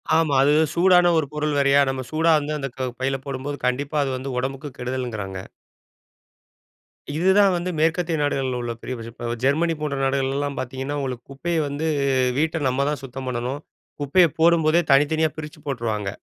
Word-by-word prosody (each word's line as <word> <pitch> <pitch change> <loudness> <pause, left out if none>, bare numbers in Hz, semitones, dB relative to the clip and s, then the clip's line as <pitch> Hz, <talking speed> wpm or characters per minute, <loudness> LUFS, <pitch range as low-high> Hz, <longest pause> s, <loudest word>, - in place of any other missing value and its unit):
ஆமா. 160 -3 +2
அது 145 - +4 0.2
சூடான 180 0 +5
ஒரு 150 -3 +1
பொருள் 150 -1 -1
வேறயா. 140 0 +4
நம்ம 130 -1 -2
சூடா 160 +1 +3
வந்து, 150 +1 -4
அந்த 135 -1 -3 0.3
பையில 135 +1 0
போடும்போது, 140 +1 -4
கண்டிப்பா 140 +4 -1
அது 135 - -2
வந்து, 135 +1 -5
உடம்புக்கு 135 +2 -4
கெடுதல்ங்கிறாங்க. 120 -7 -4 1.7
இதுதான் 190 +4 +4
வந்து, 175 +1 -2
மேற்கத்திய 165 +1 +1
நாடுகள்ல 135 -3 -1
உள்ள 120 -1 -3
பெரிய 130 - -5
பிரச் 115 0 -8
இப்போ 120 0 -9 0.2
ஜெர்மனி 160 +5 +2
போன்ற 145 -2 -2
நாடுகள்லலாம் 135 +1 -1
பாத்தீங்கன்னா, 130 +3 -4
உங்களுக்கு 125 -3 -4
குப்பைய 170 +5 -2
வந்து, 145 +3 -3 0.5
வீட்ட 160 +1 0
நம்ம 135 +2 +1
தான் 150 -2 -3
சுத்தம் 130 0 -7
பண்ணணும். 125 +4 -3 0.4
குப்பைய 170 +5 +4
போடும்போதே, 165 0 +4
தனித்தனியா 155 +2 +3
பிரிச்சு 150 -1 -8
போட்டுருவாங்க. 110 -6 -2
140 Hz, 155 wpm, -23 LUFS, 130-160 Hz, 1.7 s, சூடான